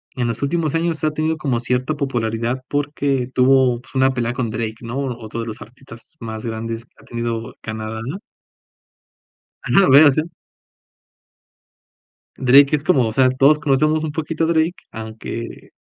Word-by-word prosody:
en 125 -2 -1
los 115 -1 -3
últimos 155 +2 0
años 165 -1 -1
ha 155 - +2
tenido 155 +1 -1
como 130 -6 -1
cierta 125 +5 -1
popularidad, 120 -2 -2
porque 145 -3 -1
tuvo, 130 -2 +3
pues, 130 - -19
una 130 0 +3
pelea 120 -1 -1
con 120 -3 -2
Drake, 110 0 -3
¿no?, 115 +2 -6
otro 120 -4 -4
de 115 - -4
los 110 0 -7
artistas 115 +1 -14
más 110 -1 -6
grandes 115 +1 -4
que - - -40
ha - - -18
tenido 115 -1 -4
Canadá. 110 0 -5 1.6
Ajá, - - +3
lo - - +4
voy 140 +2 +9
a 155 - +8
hacer. 155 +3 +2 2.1
Drake 140 +3 +5
es 145 - -3
como, 135 -10 +3
o 110 - -4
sea, 130 +1 +4
todos 140 +4 +4
conocemos 155 +2 +2
un 155 - -2
poquito 160 +1 -3
a - - +2
Drake, 165 +1 +1 0.2
aunque, 110 +1 -7
130 Hz, 165 wpm, -20 LUFS, 115-150 Hz, 2.1 s, voy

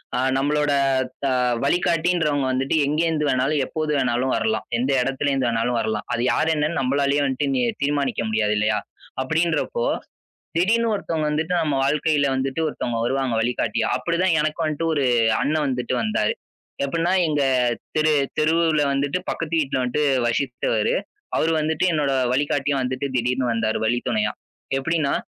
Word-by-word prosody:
ஆ, - - 0 0.2
நம்மளோட 145 +1 +1 0.5
த - - +2 0.4
வழிகாட்டின்றவுங்க 165 -3 +1
வந்துட்டு 130 +3 0
எங்கிருந்து 155 +1 0
வேணாலும், 135 +3 +1
எப்போது 155 -1 -2
வேணாலும் 125 0 0
வரலாம். 220 - -1
எந்த 130 +3 0
இடத்துல 135 +2 -1
இருந்து 135 -3 +1
வேணாலும் 115 +1 0
வரலாம். 110 -1 -3
அது 120 - -1
யார் 160 - +1
என்னன்னு 150 +2 0
நம்மளால 140 +2 +1
வந்துட்டு 135 +1 -1
நீ 130 - +1 0.2
தீர்மானிக்க 140 -3 0
முடியாது 105 -1 +1
இல்லயா! 105 0 +1 0.4
அப்பபிடின்றப்போ 165 - 0 0.7
திடீர்னு 225 +7 +2
ஒருத்தவங்க 165 -6 -2
வந்துட்டு 160 +4 -1
நம்ம 150 -3 0
வாழ்க்கையில 150 +1 +2
வந்துட்டு 135 +3 -2
ஒருத்தவங்க 120 -5 -3
வருவாங்க 135 0 0
வழிகாட்டியா! 115 -1 0
அப்பபிடிதான் 170 0 +1
எனக்கும் 155 +2 -1
வந்துட்டு 155 +1 -1
ஒரு 145 -3 +1 0.4
அண்ணன் 150 +3 +1
வந்துட்டு 125 -1 -2
வந்தாரு. 110 -1 0 0.5
எப்பபுட்ன்னா 165 +5 0
எங்க 150 -2 0 0.5
தெரு, 155 0 +3 0.3
தெருவுல 160 0 +2
வந்துட்டு 140 +4 0
பக்கத்து 165 0 -4
வீட்டுல 135 -3 -1
வந்துட்டு 125 +4 0 0.2
வசித்தவரு. 120 -3 0 0.4
அவரு 165 - +2
வந்துட்டு 155 +3 0
என்னோட 145 -3 +1 0.2
வழிகாட்டியா 145 0 0
வந்துட்டு 130 +2 -2
திடீர்னு 125 0 0
வந்தாரு 110 -1 0
வழித்துணையா! 120 - 0 0.4
எப்பபிடின்னா, 155 0 0
145 Hz, 140 wpm, -22 LUFS, 130-155 Hz, 0.7 s, தெரு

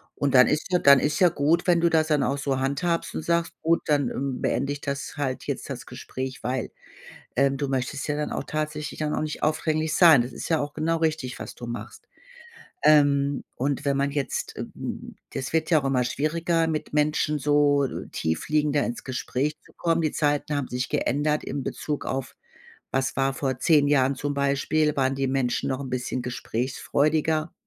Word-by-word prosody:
Und 145 -2 0
dann 125 - +8
ist 150 - 0
ja 180 - +3
dann 140 -3 +7
ist 150 +2 0
ja 180 - +6
gut, 160 +4 +1
wenn 175 -1 +4
du 170 - +4
das 160 -1 +2
dann 150 -3 +2
auch 135 +3 0
so 140 -2 -1
handhabst 140 +6 -1
und - - -3
sagst: 170 +1 0
„Gut, 165 +1 +2
dann, 145 -4 +2
ähm, 135 -1 -3
beende 140 +4 0
ich 145 - -8
das 140 0 -4
halt 130 -3 -2
jetzt, - - -4
das - - -6
Gespräch.“ 130 0 -6
Weil, 125 -2 -2 0.7
ähm, 135 +1 +3
du 140 0 -2
möchtest 135 +2 -2
ja 150 - 0
dann 150 - -2
auch - - -3
tatsächlich 150 -1 -4
dann 150 -1 -1
auch - - -1
nicht 155 0 -4
aufdringlich 155 0 0
sein. 160 -8 +7
Das 125 - -6
ist - - -6
ja 160 -2 +2
auch 145 0 -3
genau 160 +2 0
richtig, 155 -6 -1
was - - -7
du 120 - -8
machst. 120 0 -7 0.8
Ähm, 145 -2 +4
und 140 +2 -1
wenn 140 -1 +1
man 140 +1 +1
jetzt, 140 -2 -3
äh - - -3
m - - -6 0.2
das 130 +1 -4
wird 160 +1 0
ja 160 - +6
auch - - -6
immer 135 -2 +2
schwieriger, 165 +6 0
mit 155 -2 -3
Menschen 150 0 +1
so 145 -1 +3 0.2
tiefliegender 150 - 0
ins 120 - -5
Gespräch 130 +3 -2
zu - - -22
kommen. 165 -1 0
Die 155 - 0
Zeiten 145 0 0
haben 140 -2 -1
sich 125 0 -2
geändert 150 +3 0
im 140 - -4
Bezug 150 +2 -4
auf 135 -1 -4 0.6
was 135 0 0
war 135 0 +1
vor 135 -2 -2
10 150 -1 +4
Jahren 135 -1 +3
zum 145 +2 -3
Beispiel, 140 +2 +1
waren 135 0 +1
die 135 0 0
Menschen 130 -2 0
noch 130 - -2
'n 135 -2 -6
bisschen 125 0 -2
gesprächsfreudiger. 150 +6 -1
145 Hz, 200 wpm, -25 LUFS, 135-155 Hz, 0.8 s, dann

